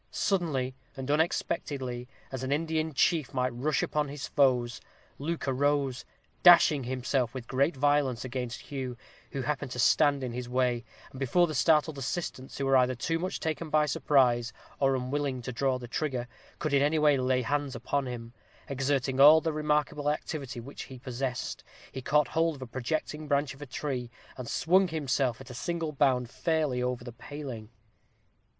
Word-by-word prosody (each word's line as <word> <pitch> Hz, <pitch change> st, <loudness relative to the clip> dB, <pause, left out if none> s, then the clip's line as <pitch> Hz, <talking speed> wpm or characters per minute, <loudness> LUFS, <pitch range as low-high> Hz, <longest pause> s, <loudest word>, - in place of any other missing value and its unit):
Suddenly 155 Hz, -10 st, 0 dB, 0.2 s
and 135 Hz, +1 st, -3 dB
unexpectedly, 135 Hz, -5 st, -1 dB, 0.2 s
as 130 Hz, -2 st, -4 dB
an 130 Hz, +1 st, -3 dB
Indian 160 Hz, +1 st, 0 dB
chief 150 Hz, -1 st, +1 dB
might 125 Hz, -1 st, 0 dB
rush 140 Hz, +4 st, 0 dB
upon 150 Hz, -1 st, 0 dB
his 145 Hz, 0 st, -6 dB
foes, 125 Hz, -4 st, +2 dB, 0.4 s
Luke 160 Hz, +1 st, -3 dB
arose, 135 Hz, -1 st, +1 dB, 0.4 s
dashing 165 Hz, -6 st, +7 dB
himself 130 Hz, -1 st, -1 dB
with 125 Hz, -2 st, -6 dB
great 140 Hz, +4 st, +1 dB
violence 140 Hz, -3 st, +1 dB
against 125 Hz, -1 st, -4 dB
Hugh, 130 Hz, -3 st, -5 dB, 0.3 s
who 135 Hz, -, -3 dB
happened 145 Hz, -1 st, -2 dB
to -, -, -7 dB
stand 140 Hz, +2 st, +4 dB
in 125 Hz, -2 st, -3 dB
his 125 Hz, 0 st, -5 dB
way, 125 Hz, -1 st, +1 dB, 0.3 s
and 130 Hz, -, -10 dB
before 155 Hz, +7 st, +3 dB
the 155 Hz, -, -4 dB
startled 155 Hz, 0 st, +3 dB
assistants, 135 Hz, -1 st, -4 dB
who 140 Hz, -, -1 dB
were 135 Hz, 0 st, +5 dB
either 130 Hz, 0 st, +3 dB
too 165 Hz, +7 st, -1 dB
much 185 Hz, +3 st, -3 dB
taken 160 Hz, 0 st, -3 dB
by 150 Hz, 0 st, +3 dB
surprise, 125 Hz, -5 st, +2 dB, 0.3 s
or 135 Hz, -1 st, +3 dB
unwilling 130 Hz, +1 st, -2 dB
to 125 Hz, -, -4 dB
draw 130 Hz, +2 st, +1 dB
a 125 Hz, -1 st, -6 dB
trigger, 125 Hz, -2 st, -2 dB, 0.3 s
could 155 Hz, -, -2 dB
in 140 Hz, -, +5 dB
any 150 Hz, +3 st, +2 dB
way 150 Hz, -1 st, +5 dB
lay 130 Hz, -1 st, +1 dB
hands 145 Hz, +2 st, -1 dB
upon 135 Hz, +3 st, -1 dB
him, 120 Hz, -1 st, -7 dB, 0.3 s
exerting 135 Hz, -1 st, 0 dB
all 150 Hz, +3 st, +9 dB
the 160 Hz, 0 st, -2 dB
remarkable 150 Hz, -1 st, 0 dB
activity 145 Hz, -4 st, -3 dB
which 135 Hz, +5 st, -8 dB
he 130 Hz, -, -10 dB
possessed, 130 Hz, 0 st, -4 dB, 0.3 s
he 130 Hz, -, -6 dB
caught 145 Hz, +3 st, +2 dB
hold 165 Hz, 0 st, +1 dB
of 135 Hz, -, -8 dB
a -, -, -6 dB
projecting 150 Hz, +5 st, -3 dB
branch 140 Hz, -1 st, +1 dB
of 140 Hz, -, -16 dB
a 145 Hz, -, -7 dB
tree, 125 Hz, -1 st, -3 dB, 0.3 s
and 130 Hz, -2 st, -7 dB
swung 185 Hz, +3 st, +3 dB
himself, 135 Hz, -6 st, 0 dB
at 135 Hz, -2 st, -10 dB
a -, -, -7 dB
single 165 Hz, +5 st, -3 dB
bound, 130 Hz, -4 st, +2 dB
fairly 150 Hz, -2 st, 0 dB
over 125 Hz, -1 st, -2 dB
the 120 Hz, -1 st, -8 dB
paling. 120 Hz, -3 st, -8 dB
135 Hz, 175 wpm, -29 LUFS, 125-150 Hz, 0.4 s, all